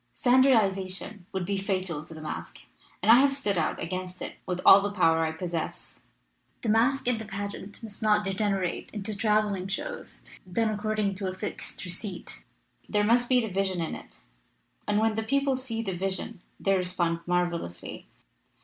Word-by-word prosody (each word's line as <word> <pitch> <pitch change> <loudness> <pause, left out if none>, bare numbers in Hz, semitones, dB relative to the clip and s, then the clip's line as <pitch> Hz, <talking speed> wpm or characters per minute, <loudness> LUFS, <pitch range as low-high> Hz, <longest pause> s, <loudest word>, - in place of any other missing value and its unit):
Standardization 210 -7 +2
would 190 -2 -2
be 200 +1 -1
fatal 185 -6 -2
to 160 - -12
the 155 - -9
masque, 155 - -6 0.4
and - - +7
I 235 - +10
have 275 0 +3
stood 205 -8 0
out 160 -3 0
against 185 +1 -4
it - - -7
with 180 -1 -2
all 195 - +10
the 205 - -1
power 165 -5 +3
I 160 - 0
possess. 165 0 -5 0.6
The 230 - 0
masque 240 +5 +3
and 235 -3 +2
the - - -6
pageant 200 +1 -6
must 215 -1 -7
not 210 -1 +4
degenerate 195 -2 -1
into 210 +1 -3
traveling 210 -3 +1
shows, 485 - -5 0.3
done 225 +3 +2
according 215 -1 0
to 195 -1 -2
a 185 - -3
fixed 185 - -5
receipt. 185 +2 -5 0.5
There 210 -1 +2
must 240 +3 +3
be 250 -1 +5
the 220 -5 -4
vision 190 -2 0
in 165 - -2
it, - - -10 0.7
and 210 0 +2
when 220 +1 +3
the 220 - -1
people 275 +4 +1
see 240 -3 -4
the 195 -4 -2
vision 195 +2 -1 0.2
they 195 0 +2
respond 180 -2 0
marvelously." 175 - -2
200 Hz, 175 wpm, -28 LUFS, 185-220 Hz, 0.7 s, I